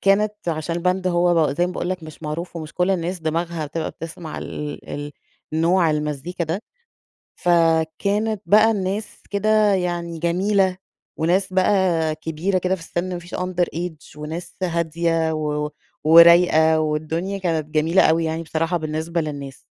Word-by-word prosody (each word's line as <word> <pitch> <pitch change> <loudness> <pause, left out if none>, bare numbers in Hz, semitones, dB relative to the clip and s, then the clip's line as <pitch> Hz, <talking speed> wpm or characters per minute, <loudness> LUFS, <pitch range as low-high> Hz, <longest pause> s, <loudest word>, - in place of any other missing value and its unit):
كانت 205 +2 +3
عشان 165 +1 -2
الباند 185 +2 0
هو 175 -4 +3
زي 175 +5 +1
ما 180 - -5
باقول 180 - -3
لك 185 -2 -3
مش 155 0 -11
معروف، 170 +3 -5
ومش 160 -1 -7
كل 180 +1 +1
الناس 180 0 -1
دماغها 165 0 -2
بتبقى 160 +2 -3
بتسمع 165 0 -8
ال 150 -1 -6
ال 145 0 -5 0.4
نوع 165 +2 +3
المزيكا 150 +3 -2
ده. 165 +6 -3 0.7
فكانت 175 +5 +1
بقى 215 +2 +6
الناس 200 0 -3
كده 210 0 +3
يعني 175 -2 -2
جميلة، 185 +3 +1 0.4
وناس 185 +4 +1
بقى 185 -4 +2
كبيرة 160 +5 -1
كده 185 +1 0
في 190 - -8
السِن، 175 +2 -3
ما 175 - -3
فيش 175 0 -11
underage، 175 -4 -3
وناس 160 +4 -6
هادية، 165 -1 0
و 150 -1 -2 0.3
ورايقة، 165 -1 +7
والدنيا 155 +5 -2
كانت 165 -5 -1
جميلة 160 +4 +3
أوي 165 +1 +3
يعني 160 +1 -2
بصراحة 165 +2 -1
بالنسبة 160 +1 -2
للناس. 140 -3 -6
170 Hz, 145 wpm, -22 LUFS, 160-185 Hz, 0.7 s, ورايقة